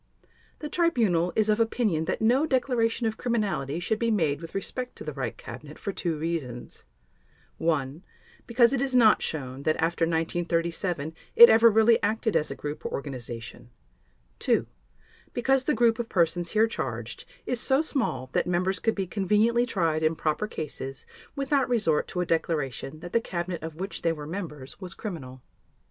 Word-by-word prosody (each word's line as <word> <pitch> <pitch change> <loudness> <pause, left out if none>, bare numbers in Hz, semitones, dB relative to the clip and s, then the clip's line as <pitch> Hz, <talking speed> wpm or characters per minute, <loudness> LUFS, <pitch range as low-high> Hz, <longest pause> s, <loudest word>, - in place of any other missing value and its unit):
The 300 - -6
Tribunal 225 - +2
is 215 -1 +2
of 215 +1 +2
opinion 220 -8 +1
that 220 - -2
no 260 +7 +3
declaration 245 -3 +1
of 220 0 -1
criminality 200 - -1
should 210 +5 -1
be 230 - +1
made 165 -9 +1
with 165 +2 -9
respect 250 +5 -4
to - - -9
the - - -5
Reich - - -4
Cabinet - - -10
for 200 - -4
two 170 -4 -2
reasons: 150 -7 -5 0.7
(1) 155 0 -1 0.4
because 235 +1 +4
it 260 - 0
is 270 -2 0
not 225 -4 +6
shown 135 -3 -3
that 155 +2 +1
after 165 +1 +1
1937 165 -1 -1 0.2
it 470 +1 +11
ever 230 +1 +7
really 225 +1 +4
acted 220 +1 0
as 150 - +2
a 135 - -5
group 145 +1 -6
or - - -4
organization; 120 -4 -6 0.7
(2) - - +2 0.7
because 260 +2 +2
the 300 - +2
group 230 0 +3
of 235 - -3
persons 170 -1 +1
here 220 +1 +5
charged 225 - -5 0.2
is 250 -2 0
so 270 +3 +3
small 130 - -2
that - - +1
members 185 +2 0
could 225 -1 0
be 195 - -1
conveniently 215 +6 +2
tried 165 -7 0
in 160 +1 +2
proper 155 +7 -1
cases 135 -7 -6 0.3
without 275 -1 +1
resort 205 -11 +1
to 180 - -3
a - - 0
declaration 155 -3 -2
that 175 0 -9
the 230 - +3
Cabinet 175 -3 -4
of 160 0 -6
which 190 +4 -4
they 165 - +2
were 150 -2 -6
members 155 -4 -7
was 180 -2 -7
criminal. 130 - -7
180 Hz, 175 wpm, -27 LUFS, 160-230 Hz, 0.7 s, it